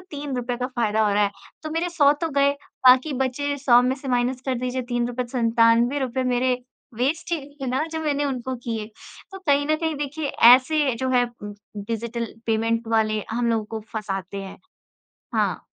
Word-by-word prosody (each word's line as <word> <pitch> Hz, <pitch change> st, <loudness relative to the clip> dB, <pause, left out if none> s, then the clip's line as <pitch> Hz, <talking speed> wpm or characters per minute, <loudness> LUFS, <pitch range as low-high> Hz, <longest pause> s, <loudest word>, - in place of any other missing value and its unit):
₹3 260 Hz, -5 st, -3 dB
का 250 Hz, -, -2 dB
फ़ायदा 220 Hz, -4 st, 0 dB
हो 205 Hz, -, +1 dB
रहा 205 Hz, 0 st, +4 dB
है। 200 Hz, -, 0 dB, 0.3 s
तो 310 Hz, -, -5 dB
मेरे 330 Hz, +3 st, -1 dB
₹100 295 Hz, -2 st, +3 dB
तो -, -, -5 dB
गए, 280 Hz, -, +5 dB, 0.4 s
बाकी 255 Hz, +4 st, +6 dB
बचे, 285 Hz, +3 st, -2 dB
₹100 250 Hz, -2 st, +5 dB
में 260 Hz, -, 0 dB
से 270 Hz, -, -8 dB
माइनस 250 Hz, 0 st, 0 dB
कर 260 Hz, -, +1 dB
दीजिए 255 Hz, +1 st, -2 dB
₹3 240 Hz, +1 st, -1 dB
₹97 240 Hz, +2 st, +2 dB
मेरे 255 Hz, +1 st, +2 dB, 0.4 s
वेस्ट 290 Hz, +8 st, -1 dB
ही 335 Hz, -, +1 dB, 0.2 s
हैं -, -, -2 dB
ना, 260 Hz, +4 st, 0 dB
जो 320 Hz, 0 st, -5 dB
मैंने 290 Hz, -2 st, 0 dB
उनको 260 Hz, -2 st, -3 dB
किए। 225 Hz, -3 st, -3 dB, 0.5 s
तो 385 Hz, -, -7 dB
कहीं 285 Hz, -6 st, +1 dB
न 310 Hz, +1 st, +2 dB
कहीं 320 Hz, 0 st, -2 dB
देखिए, 290 Hz, +1 st, -3 dB
ऐसे 260 Hz, +4 st, +5 dB
जो 260 Hz, -, -1 dB
है 245 Hz, -1 st, +4 dB
उम 235 Hz, -3 st, -9 dB
उम, 205 Hz, -, -8 dB, 0.3 s
डिजिटल 235 Hz, +1 st, -3 dB, 0.2 s
पेमेंट 225 Hz, +1 st, 0 dB
वाले, 215 Hz, -1 st, +1 dB
हम 235 Hz, +1 st, 0 dB
लोगों 225 Hz, -2 st, 0 dB
को -, -, -4 dB
फँसातें 195 Hz, -3 st, -4 dB
हैं। 195 Hz, -1 st, -9 dB, 0.8 s
हाँ। -, -, 0 dB
250 Hz, 185 wpm, -23 LUFS, 230-285 Hz, 0.8 s, बाकी